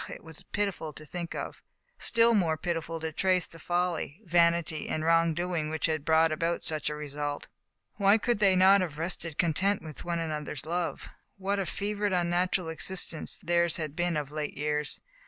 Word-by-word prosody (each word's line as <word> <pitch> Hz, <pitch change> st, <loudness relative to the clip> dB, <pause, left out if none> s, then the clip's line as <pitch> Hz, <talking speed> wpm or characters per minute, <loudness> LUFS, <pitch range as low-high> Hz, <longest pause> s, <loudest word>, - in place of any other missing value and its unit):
it -, -, -8 dB
was 160 Hz, -2 st, -10 dB
pitiful 200 Hz, -6 st, -1 dB
to 155 Hz, +1 st, -10 dB
think 170 Hz, +2 st, -5 dB
of; -, -, -5 dB, 0.4 s
still 235 Hz, 0 st, +4 dB
more 170 Hz, -7 st, +2 dB
pitiful 165 Hz, 0 st, -3 dB
to 160 Hz, 0 st, -3 dB
trace 185 Hz, +2 st, +2 dB
the 165 Hz, -, -14 dB
folly, 175 Hz, -2 st, -1 dB
vanity, 170 Hz, -2 st, +2 dB
and 155 Hz, 0 st, -1 dB
wrong 165 Hz, 0 st, +4 dB
doing 175 Hz, -3 st, -1 dB
which 160 Hz, 0 st, -1 dB
had 155 Hz, -3 st, 0 dB
brought 160 Hz, +1 st, +4 dB
about 165 Hz, +2 st, -1 dB
such 155 Hz, -1 st, -1 dB
a 150 Hz, -, -3 dB
result. 145 Hz, -1 st, -4 dB, 0.5 s
Why 200 Hz, +1 st, +5 dB
could 235 Hz, 0 st, 0 dB
they 195 Hz, -2 st, +5 dB
not 190 Hz, +2 st, +6 dB
have 160 Hz, -5 st, -3 dB
rested 165 Hz, -1 st, -3 dB
content 190 Hz, +4 st, +2 dB
with 155 Hz, -2 st, -8 dB
one 170 Hz, -1 st, -1 dB
another's 150 Hz, -4 st, -3 dB
love. 170 Hz, -2 st, -2 dB, 0.3 s
What 195 Hz, +1 st, -1 dB
a 190 Hz, -, -1 dB
fevered, 205 Hz, 0 st, -1 dB
unnatural 175 Hz, 0 st, +1 dB
existence 165 Hz, -1 st, -2 dB
theirs 170 Hz, 0 st, +2 dB
had 155 Hz, -3 st, -4 dB
been 175 Hz, -1 st, +1 dB
of 145 Hz, -2 st, -3 dB
late 150 Hz, -1 st, -4 dB
years. 150 Hz, 0 st, -1 dB
170 Hz, 180 wpm, -29 LUFS, 155-180 Hz, 0.5 s, not